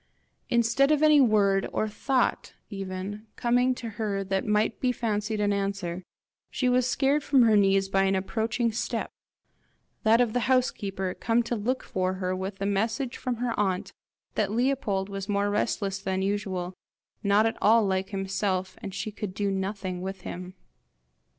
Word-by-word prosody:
Instead 235 Hz, +4 st, +3 dB
of 305 Hz, 0 st, +3 dB
any 305 Hz, -2 st, +7 dB
word, 200 Hz, -5 st, +3 dB
or 215 Hz, -, 0 dB
thought 255 Hz, +5 st, -1 dB, 0.2 s
even, 195 Hz, +2 st, -5 dB
coming 245 Hz, +1 st, +2 dB
to 240 Hz, -, -6 dB
her 200 Hz, -2 st, -1 dB
that 195 Hz, 0 st, -1 dB
might 210 Hz, +1 st, +1 dB
be 255 Hz, -, +2 dB
fancied 215 Hz, -2 st, -2 dB
an 205 Hz, -1 st, +2 dB
answer, 195 Hz, -3 st, -2 dB, 0.5 s
she 255 Hz, -, -1 dB
was 250 Hz, 0 st, +3 dB
scared 280 Hz, +2 st, +2 dB
from 270 Hz, -3 st, +4 dB
her 220 Hz, -2 st, +5 dB
knees 195 Hz, -1 st, +4 dB
by 195 Hz, 0 st, +2 dB
an 195 Hz, 0 st, +2 dB
approaching 225 Hz, +4 st, 0 dB
step 220 Hz, -, -3 dB, 0.9 s
that 225 Hz, +1 st, +4 dB
of 240 Hz, -3 st, +2 dB
the 245 Hz, -, +2 dB
house 255 Hz, -1 st, +4 dB
keeper 195 Hz, -2 st, -4 dB
come 235 Hz, +1 st, +1 dB
to 235 Hz, +1 st, -2 dB
look 245 Hz, +5 st, -1 dB
for 185 Hz, 0 st, -1 dB
her 185 Hz, 0 st, -2 dB
with 190 Hz, +2 st, -4 dB
the 195 Hz, -, -3 dB
message 220 Hz, +5 st, -1 dB
from 250 Hz, -1 st, -3 dB
her 240 Hz, 0 st, -2 dB
aunt 190 Hz, -1 st, -1 dB, 0.4 s
that 205 Hz, -2 st, 0 dB
Leopold 230 Hz, -5 st, 0 dB
was 195 Hz, 0 st, -6 dB
more 205 Hz, 0 st, +1 dB
restless 200 Hz, -2 st, -1 dB
than 190 Hz, 0 st, -2 dB
usual, 190 Hz, -3 st, -2 dB, 0.5 s
not 205 Hz, +2 st, +3 dB
at 225 Hz, -, 0 dB
all 220 Hz, +1 st, +5 dB
like 190 Hz, 0 st, -1 dB
himself, 195 Hz, -1 st, -2 dB
and 195 Hz, -1 st, -6 dB
she 215 Hz, +2 st, -3 dB
could 205 Hz, -2 st, -6 dB
do 200 Hz, -1 st, 0 dB
nothing 190 Hz, -1 st, -3 dB
with 190 Hz, 0 st, -5 dB
him. 180 Hz, +1 st, -7 dB
205 Hz, 170 wpm, -27 LUFS, 195-230 Hz, 0.9 s, any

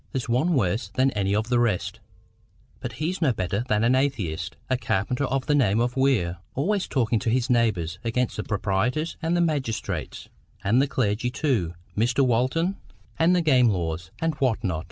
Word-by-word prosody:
There's 130 Hz, -3 st, -2 dB
one 135 Hz, +9 st, +2 dB
worse 100 Hz, -2 st, 0 dB
than 130 Hz, +6 st, +2 dB
any 100 Hz, -2 st, 0 dB
of 110 Hz, +2 st, -1 dB
the 120 Hz, -1 st, +3 dB
rest—but 110 Hz, -7 st, -5 dB
he's 175 Hz, +5 st, -3 dB
no 150 Hz, -5 st, +4 dB
better 100 Hz, +2 st, -2 dB
than 105 Hz, -1 st, +1 dB
an 120 Hz, +2 st, +4 dB
atheist—a 130 Hz, -, -1 dB
carpenter 125 Hz, +4 st, -1 dB
of 135 Hz, 0 st, -1 dB
the 150 Hz, -, +1 dB
name 115 Hz, -7 st, +3 dB
of 120 Hz, +1 st, 0 dB
Weir, 125 Hz, -11 st, +1 dB, 0.2 s
always 190 Hz, +8 st, 0 dB
talking 115 Hz, -4 st, +1 dB
to 115 Hz, -, -1 dB
his 125 Hz, +2 st, +1 dB
neighbours 95 Hz, -8 st, +1 dB
against 120 Hz, +1 st, -1 dB
the 105 Hz, -, -2 dB
proprietors 110 Hz, -, -1 dB
and 165 Hz, +1 st, +1 dB
the -, -, +2 dB
magistrates, 145 Hz, -9 st, -2 dB, 0.4 s
and 115 Hz, +6 st, +3 dB
the 140 Hz, -, +2 dB
clergy 120 Hz, -2 st, 0 dB
too, 120 Hz, -, -1 dB, 0.2 s
Mr 120 Hz, +5 st, +2 dB
Walton, 130 Hz, +10 st, +1 dB, 0.4 s
and 170 Hz, +3 st, +4 dB
the 175 Hz, -, +2 dB
game 130 Hz, -6 st, +5 dB
laws; 85 Hz, -4 st, -2 dB
and 165 Hz, 0 st, 0 dB
what 120 Hz, -4 st, +1 dB
not? 90 Hz, -6 st, -1 dB
120 Hz, 175 wpm, -25 LUFS, 105-135 Hz, 0.4 s, game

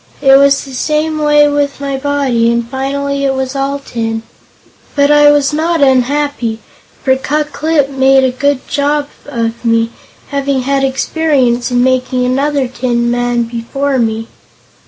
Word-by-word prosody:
It 270 Hz, -1 st, +5 dB
was 280 Hz, 0 st, +3 dB
the 270 Hz, -, -11 dB
same 310 Hz, +3 st, -1 dB
way 295 Hz, -1 st, +4 dB
with 290 Hz, -1 st, -1 dB
my 280 Hz, -1 st, -3 dB
body, 265 Hz, -4 st, 0 dB
and 235 Hz, 0 st, -1 dB
finally 275 Hz, +2 st, -2 dB
I -, -, +1 dB
was 265 Hz, 0 st, -2 dB
all 275 Hz, +1 st, -1 dB
tin. 225 Hz, -4 st, -4 dB, 0.7 s
But 285 Hz, 0 st, +3 dB
I 295 Hz, 0 st, +6 dB
was 290 Hz, 0 st, +2 dB
not 325 Hz, +1 st, 0 dB
unhappy, 265 Hz, -3 st, +1 dB, 0.5 s
for 260 Hz, -1 st, +3 dB
Ku 295 Hz, +3 st, -1 dB
Klip 300 Hz, 0 st, 0 dB
made 270 Hz, 0 st, +3 dB
a 260 Hz, -, +2 dB
good 280 Hz, +1 st, -1 dB
job 290 Hz, 0 st, -1 dB, 0.2 s
of 235 Hz, -4 st, -3 dB
me, 230 Hz, 0 st, +1 dB, 0.4 s
having 280 Hz, -1 st, -1 dB
had 275 Hz, +1 st, 0 dB
experience 265 Hz, -3 st, 0 dB
in 245 Hz, 0 st, +2 dB
making 255 Hz, 0 st, 0 dB
another 275 Hz, +1 st, 0 dB
tin 240 Hz, -1 st, -1 dB
man 245 Hz, 0 st, 0 dB
before 250 Hz, +4 st, -2 dB
me." 225 Hz, -1 st, -1 dB
270 Hz, 155 wpm, -13 LUFS, 245-285 Hz, 0.7 s, I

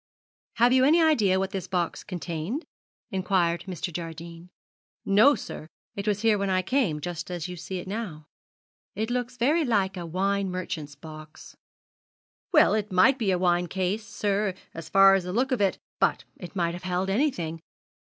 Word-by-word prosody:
'Have 240 Hz, +2 st, +4 dB
you 260 Hz, 0 st, +5 dB
any 310 Hz, +5 st, +5 dB
idea 235 Hz, -, +3 dB
what 190 Hz, 0 st, -1 dB
this 190 Hz, -2 st, -4 dB
box 175 Hz, -3 st, -2 dB
contained?' 175 Hz, -, -4 dB, 0.5 s
inquired 185 Hz, -3 st, 0 dB
Mr. 180 Hz, -1 st, -4 dB
Jardine. 170 Hz, +1 st, -7 dB, 0.6 s
'No, 220 Hz, +9 st, +6 dB
sir. 155 Hz, -, -8 dB, 0.3 s
It 200 Hz, +1 st, -5 dB
was 210 Hz, 0 st, 0 dB
here 220 Hz, -2 st, +3 dB
when 200 Hz, 0 st, -1 dB
I 185 Hz, 0 st, +1 dB
came, 190 Hz, -, 0 dB
just 175 Hz, +3 st, -5 dB
as 175 Hz, -1 st, -4 dB
you 180 Hz, -, -6 dB
see 175 Hz, +2 st, -6 dB
it 180 Hz, -, -7 dB
now.' 190 Hz, -7 st, -5 dB, 0.7 s
'It 220 Hz, +4 st, -2 dB
looks 245 Hz, 0 st, -2 dB
very 295 Hz, +8 st, +2 dB
like 200 Hz, -7 st, 0 dB
a 175 Hz, -1 st, -5 dB
wine 195 Hz, +3 st, 0 dB
merchant's 160 Hz, -5 st, -5 dB
box.' 155 Hz, -1 st, -12 dB, 1.0 s
'Well, 305 Hz, -, +5 dB
it 215 Hz, -1 st, -1 dB
might 230 Hz, +9 st, +4 dB
be 215 Hz, -4 st, 0 dB
a 185 Hz, -, +2 dB
wine 175 Hz, -1 st, +2 dB
case, 190 Hz, +4 st, -2 dB
sir, 205 Hz, -2 st, -1 dB, 0.2 s
as 165 Hz, -1 st, -8 dB
far 195 Hz, +1 st, +7 dB
as 195 Hz, -1 st, +2 dB
the 180 Hz, -, -5 dB
look 255 Hz, +5 st, +1 dB
of 250 Hz, -5 st, +1 dB
it 195 Hz, -2 st, +3 dB
goes; -, -, -29 dB, 0.2 s
but -, -, +1 dB
it 180 Hz, +2 st, -10 dB
might 170 Hz, -2 st, 0 dB
have 175 Hz, -, -7 dB
held 185 Hz, 0 st, -1 dB
anything. 180 Hz, -, -1 dB
190 Hz, 185 wpm, -26 LUFS, 175-215 Hz, 1.0 s, far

